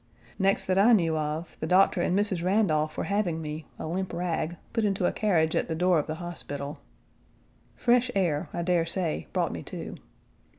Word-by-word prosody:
Next 195 0 +2
that 185 0 +2
I 230 +4 +6
knew 165 -6 +3
of, 155 +2 -3
the 160 - -3
doctor 185 0 +4
and 180 +2 +1
Mrs. 200 -4 0
Randolph 160 -6 +1
were - - -1
having 200 -5 0
me, 155 0 -6
a - - -5
limp 180 +3 -3
rag, 170 -1 -2 0.2
put 225 -1 +1
into 195 -3 +1
a - - +3
carriage 165 -7 +1
at - - +1
the 160 - -2
door 175 0 +3
of 150 - -3
the 155 - -3
hospital. 150 -4 -6 1.0
Fresh 245 +1 +3
air, 165 -4 0
I 170 - -3
dare 170 -1 +2
say, 165 - -2
brought - - 0
me - - -5
to. - - -7
175 Hz, 195 wpm, -27 LUFS, 160-195 Hz, 1.0 s, I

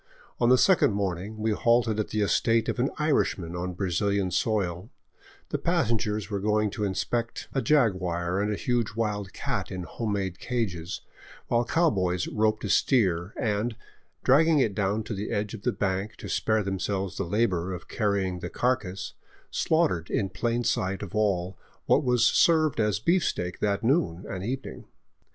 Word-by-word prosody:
On 120 - +3
the 130 - +7
second 180 - +4
morning 100 +1 -3
we 110 +1 0
halted 115 0 +2
at 105 - 0
the 110 - -1
estate 115 +2 +2
of - - -2
an 130 +3 +2
Irishman 105 - 0
on 90 +1 -4
Brazilian 95 +1 0
soil, 95 0 -1 0.6
the - - -2
passengers 105 -2 0
going 105 +1 0
to 105 - -4
inspect 115 +4 -2
a 135 - +1
jaguar 95 - +1
and 105 +1 0
a - - 0
huge 120 -3 -1
wild 105 -4 -2
cat - - -3
in 95 -1 -4
home 105 +4 -3
made 95 -3 -3
cages, 95 -8 -3 0.5
while 120 0 +3
cow 165 +6 +3
boys 90 -3 0
roped 110 0 0
a 105 - -3
steer 95 -7 +2
and, 110 +2 0 0.5
dragging 155 +4 +5
it 115 -7 +2
down 100 +2 0
to 105 - -5
the 105 +1 -4
edge 105 -1 -2
of 110 - -7
the - - +1
bank 100 +2 -2
to - - -9
spare 110 -1 +1
themselves 95 0 -2
the - - -1
labor 95 -2 0
of 90 -1 -7
carrying 100 -4 -1
the - - -5
carcass, 110 -7 -1 0.4
slaughtered 160 - +1
in 95 - 0
plain 115 +6 -1
sight 95 -2 -1
of 100 - -8
all 95 -4 0 0.3
what - - +3
was 125 -3 +3
served 155 0 +4
as 105 -4 +2
beefsteak 110 - 0
that 100 +1 0
noon 100 - +1
and 95 -1 -5
evening. 130 +5 -5
105 Hz, 170 wpm, -27 LUFS, 95-115 Hz, 0.6 s, the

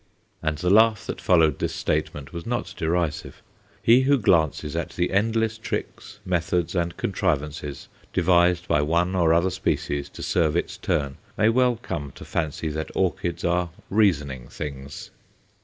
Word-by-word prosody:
And 80 -1 -1
the 90 +4 0
laugh 110 0 +5
that - - -5
followed 80 -5 +3
this - - -2
statement 70 -2 -2
was 85 -1 -5
not 120 0 -2
derisive. 85 -3 -2 0.4
He 120 +3 +6
who 140 +2 +4
glances 80 - +1
at - - -2
the 90 +1 -1
endless 110 +2 +1
tricks, 105 -2 -5
methods, 90 -1 0
and 85 -2 -1
contrivances 75 -6 -2 0.2
devised 90 0 +3
by 75 - +3
one 85 +5 +1
or 85 -3 +3
other 85 +3 +3
species 70 -5 -2
to - - -9
serve 80 -3 +1
its 85 - -1
turn 70 -2 -1 0.2
may 110 - +4
well 125 +1 +3
come 75 - -5
to - - -11
fancy 80 0 -2
that 80 +1 -4
orchids 85 -1 -1
are 90 0 +1 0.2
reasoning 75 - +1
things. 70 -1 -7
85 Hz, 155 wpm, -24 LUFS, 75-95 Hz, 0.4 s, He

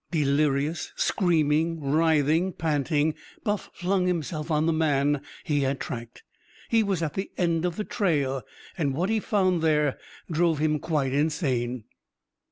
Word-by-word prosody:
Delirious 145 0 +1
screaming, 165 -2 +1
writhing, 155 +4 +2
panting 155 -1 +1 0.3
Buff 205 -2 -2
flung 185 0 0
himself 160 -2 -2
on 155 -1 +2
the 165 - +2
man 145 -2 +2 0.2
he 150 -2 0
had 135 0 0
tracked. 115 -2 -7 0.5
He 225 -1 +4
was 195 -5 0
at 150 -3 -2
the 190 - -3
end 170 -1 +1
of 175 -2 -1
the 210 - -2
trail! 145 - 0 0.4
And 140 -4 0
what 180 +6 0
he 220 - +2
found 185 -5 +1
there 150 -3 +2 0.3
drove 165 0 +2
him 150 0 +1
quite 140 -4 -1
insane. 130 - 0
155 Hz, 145 wpm, -26 LUFS, 145-175 Hz, 0.5 s, He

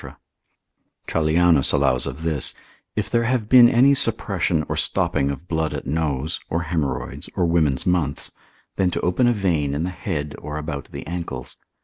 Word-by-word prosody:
Trallianus 80 -2 +3
allows 65 - +2
of 70 +6 -6
this, 80 -5 +1 0.4
If 105 -2 -1
there 115 +2 +1
have 120 -3 0
been 120 0 +8
any 130 +4 +5
suppression 95 - 0
or - - -2
stopping 70 0 0
of 70 +5 -6
blood 80 -2 -1
at - - -6
nose, 75 0 -1
or 85 +1 -1
haemorrhoids, 70 -7 -3
or 90 - +1
women's 80 -5 +1
months, 85 -6 0 0.5
then 95 -2 +2
to - - -3
open 90 +8 +2
a - - +4
vein 80 -9 0
in 75 - -1
the 90 - -2
head 80 -5 -4
or 75 0 -6
about 75 -2 -5
the - - -9
ankles. 80 -7 -5
80 Hz, 165 wpm, -22 LUFS, 75-90 Hz, 0.5 s, been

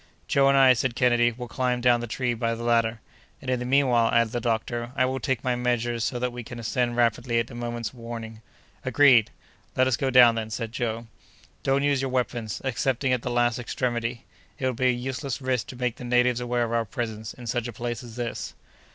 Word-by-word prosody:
"Joe 135 0 +4
and 140 0 +4
I," 130 -1 +7
said 125 0 -1
Kennedy, 120 -1 +3
"will 120 +1 -7
climb 125 +1 -1
down 120 -1 +4
the 120 - -5
tree 120 +2 -1
by 115 0 -1
the 115 - -7
ladder." 115 -1 +1 0.4
"And, 130 -2 -4
in 125 - +1
the 125 - -4
meanwhile," 125 -4 +3
added 115 -1 +3
the 120 - -1
doctor, 120 +1 -2
"I 130 - +3
will 130 +1 -2
take 130 +1 -1
my 125 -1 +1
measures 120 -1 -1
so 125 - -1
that 125 0 -1
we 120 0 -7
can 120 +1 -9
ascend 120 +1 -1
rapidly 120 0 +1
at 115 +2 -1
a - - -9
moment's 120 -1 -4
warning." 115 -2 -8 0.4
"Agreed!" 130 -7 +5 0.5
"Let 130 - +4
us 130 -2 +1
go 135 - 0
down, 125 -2 +7
then!" 110 -1 -3
said 115 0 -4
Joe. 115 -1 -3 0.6
"Don't 135 +1 +1
use 140 -2 +2
your 135 - -1
weapons, 120 -4 -2
excepting 130 0 0
at 125 - 0
the 125 - -4
last 120 0 +1
extremity! 120 -1 -2 0.3
It 130 - -3
would 130 -1 0
be 130 +2 +1
a - - +5
useless 130 +2 -3
risk 130 -4 -1
to - - -8
make 125 -1 -2
the - - -9
natives 125 0 +2
aware 120 0 0
of 115 0 -2
our 115 -1 +2
presence 110 0 -5
in 125 - -11
such 120 +1 -2
a - - -5
place 120 +2 -4
as 120 -3 -11
this." 120 -1 -4
120 Hz, 230 wpm, -26 LUFS, 115-125 Hz, 0.6 s, I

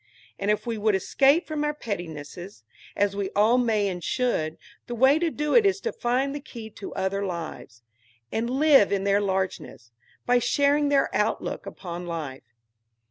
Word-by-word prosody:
And 200 - -1
if 210 +3 +1
we 230 -2 -3
would 210 -1 +2
escape 275 - +3
from 305 -1 -2
our 295 0 -1
pettinesses, 175 - -7 0.3
as 200 0 +1
we 200 -1 -2
all 220 +5 +4
may 220 -4 +1
and 180 -3 -4
should, 165 -11 -1 0.3
the 240 - -4
way 265 +6 +5
to 340 0 +1
do 300 -1 -2
it 470 - +7
is 395 -1 +2
to 465 - -2
find 255 +3 0
the 290 - -4
key 230 -6 -10
to 205 - -8
other 190 +1 -1
lives, 165 - -6 0.5
and 230 +2 -1
live 270 -5 +5
in 195 -1 0
their 200 +1 +2
largeness, 190 - -3 0.3
by 245 0 +4
sharing 285 +3 +2
their 280 -1 +2
outlook 210 -1 -1
upon 175 -2 -7
life. 135 -8 -6
210 Hz, 175 wpm, -25 LUFS, 190-270 Hz, 0.5 s, it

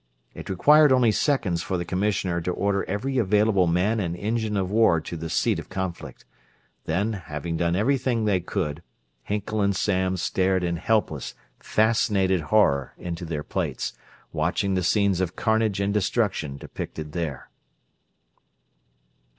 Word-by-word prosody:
It - - -9
required 150 - +5
only 125 -3 +4
seconds 105 - 0
for 95 - -2
the 85 - -3
commissioner 90 -2 -1
to 90 - -2
order 100 +1 0
every 125 +7 -2
available 105 -3 +3
man 95 +7 +1
and 85 -4 -2
engine 110 0 -1
of 95 -1 -1
war 110 -6 +4
to 80 - -7
the 80 0 -5
seat - - +1
of - - -10
conflict; 85 -8 -5 0.6
then, 100 +7 0
having 80 -3 -5
done 85 +1 0
everything 120 +1 +1
they 100 -3 +2
could, 85 -4 -3 0.4
Hinkle 105 - -2
and 100 -1 +2
Samms 95 -2 0
stared 95 -1 +1
in 85 -1 -1
helpless, 110 +5 -1 0.2
fascinated 105 -4 +2
horror 75 - +2
into 85 0 -5
their 75 -3 -4
plates, - - -3 0.4
watching 90 +6 0
the 95 - +1
scenes 100 0 +2
of 90 -2 -2
carnage 110 -3 +1
and 100 0 0
destruction 95 - 0
depicted 75 +2 -7
there. 75 -6 -5
95 Hz, 145 wpm, -25 LUFS, 85-105 Hz, 0.6 s, required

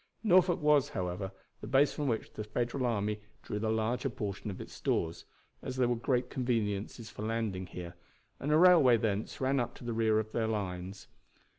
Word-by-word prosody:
Norfolk 180 -4 +5
was, 145 -1 +4
however, 95 -1 -3 0.3
the 105 - -8
base 135 +4 +4
from 145 -2 -2
which 115 -3 -2
the 110 - -5
Federal 120 +4 -1
army 105 -2 -1 0.2
drew 105 - -3
the 110 +1 -1
larger 110 +5 0
portion 105 -2 -4
of 95 - -6
its - - -8
stores; 80 0 -1 0.4
as 130 - -5
there 130 -1 +2
were 120 - +1
great 125 +1 0
conveniences 115 -3 -2
for - - -9
landing 110 -4 -2
here, 85 -1 -7 0.5
and 145 - -2
a 155 - +6
railway 160 -9 +7
thence 105 -1 -2
ran 135 +1 +2
up 120 - -2
to - - -12
the 120 -1 -3
rear 110 -1 +2
of 110 0 -1
their 110 -1 0
lines. 95 -3 -4
115 Hz, 190 wpm, -32 LUFS, 105-130 Hz, 0.5 s, railway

